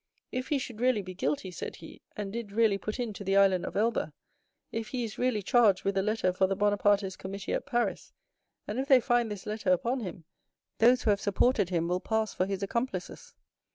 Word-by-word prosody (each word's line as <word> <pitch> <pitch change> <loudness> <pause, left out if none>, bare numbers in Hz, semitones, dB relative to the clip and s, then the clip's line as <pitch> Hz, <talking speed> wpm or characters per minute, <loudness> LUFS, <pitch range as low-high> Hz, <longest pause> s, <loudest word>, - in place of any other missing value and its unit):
'If 255 +1 -3
he 295 - +1
should 240 -4 -6
really 250 -5 +2
be 185 0 -7
guilty,' 150 +3 -2
said 175 - -6
he, 160 - -13 0.2
'and 205 -1 -4
did 230 -3 -5
really 215 -2 +3
put 215 +5 -5
in 235 -3 -2
to 200 - -8
the 195 0 +2
Island 190 -2 +4
of - - -5
Elba; 230 +3 0 0.6
if 225 -1 -3
he 250 0 -3
is 220 -2 -6
really 245 -5 +1
charged 210 -3 +4
with 195 0 0
a 195 - +2
letter 210 -2 0
for 190 +1 +2
the 195 - -1
Bonapartist 205 -1 +2
committee 195 +1 -5
at - - -2
Paris, 240 -3 -1 0.6
and 215 +4 -3
if 270 - -2
they 265 -2 +7
find 240 -2 +1
this 205 -2 -7
letter 210 -3 -1
upon 235 +8 +1
him, 180 -6 -7 0.6
those 245 +3 +5
who 215 - +4
have 200 - 0
supported 205 -1 +2
him 170 -2 0
will 180 +1 0
pass 220 +1 -1
for 185 - 0
his 195 0 -3
accomplices. 195 -3 -4
205 Hz, 220 wpm, -29 LUFS, 190-235 Hz, 0.6 s, they